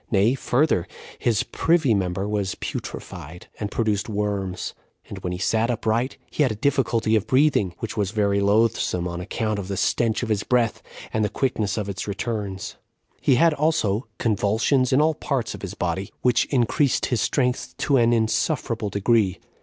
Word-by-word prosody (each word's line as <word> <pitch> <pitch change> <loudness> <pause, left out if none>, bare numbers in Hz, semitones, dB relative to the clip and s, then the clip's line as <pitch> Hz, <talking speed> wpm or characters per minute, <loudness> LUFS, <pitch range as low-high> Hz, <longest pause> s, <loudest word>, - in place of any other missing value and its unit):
Nay, 105 +3 +3
further, 135 - +1 0.3
his 115 -4 +1
privy 160 -7 +2
member 95 0 -1
was 100 -3 -1
putrefied, 90 +2 -7
and 105 - -2
produced 110 -1 -1
worms; 100 -3 -2 0.3
and - - -7
when 90 - -4
he 90 - -3
sat 110 +5 +1
upright, 120 +2 0
he - - -1
had 135 -5 +3
a - - -3
difficulty 115 -3 +1
of 110 0 0
breathing, 130 - +3
which 115 - -5
was 105 -4 0
very 100 -1 +1
loathsome, 100 -3 +2
on 85 0 -4
account 110 +2 -2
of 95 - -5
the 100 -1 -3
stench 115 +3 +1
of 120 - -3
his 105 -2 +1
breath, 120 -2 +1 0.3
and 110 - +1
the 105 - +1
quickness 110 -7 -1
of 105 -2 -2
its 100 +1 -4
returns; 100 -2 -4 0.4
he 135 - +4
had 165 +5 +4
also 140 -8 +1
convulsions 115 +5 +1
in 135 +3 +4
all 160 +1 +3
parts 135 -4 -2
of - - -9
his - - -6
body, 95 +1 -2
which 125 -2 +3
increased 135 +2 +1
his 115 - +1
strength 125 -3 0
to 140 - +2
an 120 -1 +4
insufferable 115 0 0
degree. 100 -1 +2
110 Hz, 175 wpm, -24 LUFS, 100-125 Hz, 0.4 s, he